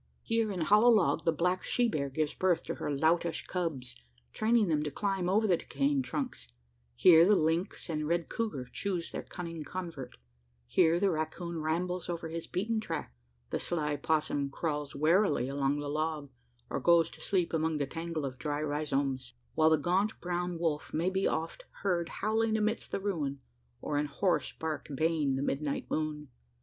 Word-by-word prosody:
Here 225 -2 +1
in 185 -3 -3
hollow 210 +8 +6
log 215 -7 +3
the 165 - +4
black 180 +3 0
she 245 -1 +2
bear 140 -10 -1
gives 150 +2 -1
birth 185 -3 +1
to - - -3
her - - -4
loutish 160 +4 +1
cubs, 145 -9 -3 0.4
training 220 -1 +3
them 155 -3 +2
to 150 - -2
climb 190 +3 -1
over 215 +4 +3
the 185 -5 +4
decaying 275 - 0
trunks; 260 - -4 0.5
here 165 - +8
the 205 +4 +5
lynx 165 +4 0
and 155 -3 -2
red 170 0 0
couguar 210 - -3
choose 185 -4 -2
their - - -4
cunning 165 -3 -6
convert; 160 -6 -6 0.5
here 160 - +3
the 195 0 +3
racoon 165 +1 -3
rambles 180 +3 -1
over 170 -1 -3
his 165 0 -5
beaten 220 +5 -1
track; 160 - -5 0.4
the - - 0
sly 150 -4 -1
opossum 145 -1 0
crawls 150 0 -3
warily 160 - +3
along 140 +1 0
the 145 0 -4
log, 150 -1 -2 0.4
or - - -2
goes 170 -1 +4
to - - -13
sleep 180 -5 0
among 160 -1 +1
the 145 - 0
tangle 165 +1 -4
of 130 -1 -6
dry 145 +3 -2
rhizomes; 140 -4 -1 0.2
while 160 0 +4
the 160 - +5
gaunt 185 +8 0
brown 175 0 -2
wolf 160 -3 -1
may 170 +4 +1
be 190 0 +1
often 165 - -3 0.2
heard 175 -4 +1
howling 220 +1 +1
amidst 215 +1 -1
the - - -1
ruin, 155 -9 -2 0.4
or 145 -1 -1
in 150 - 0
hoarse 155 -1 0
bark 160 -1 -4
baying 155 -2 +1
the 135 - -1
midnight 140 0 -1
moon. 150 -2 -2
165 Hz, 180 wpm, -31 LUFS, 150-185 Hz, 0.5 s, here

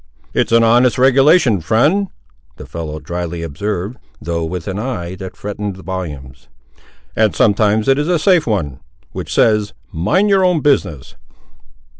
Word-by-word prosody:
"It's - - 0
an 115 0 +5
honest 120 +2 +3
regulation, 135 - +4
friend," 150 - +2 0.5
the - - -9
fellow, 80 -2 -6
drily 85 0 -5
observed, 100 - -4 0.2
though 85 +2 -3
with 85 +2 -5
an 100 0 -3
eye 105 -8 -4
that 95 0 -9
threatened 105 -1 -5
volumes, 75 -9 -7 0.7
"and 110 -6 +2
sometimes 105 +1 +2
it 135 +1 +3
is 150 - -1
a 175 -1 +2
safe 175 0 +2
one, 80 - -2 0.3
which - - -7
says, 105 -2 +2 0.2
mind 105 - +1
your 195 -2 +3
own 180 -4 +2
business." 85 - -1
105 Hz, 145 wpm, -17 LUFS, 85-130 Hz, 0.7 s, an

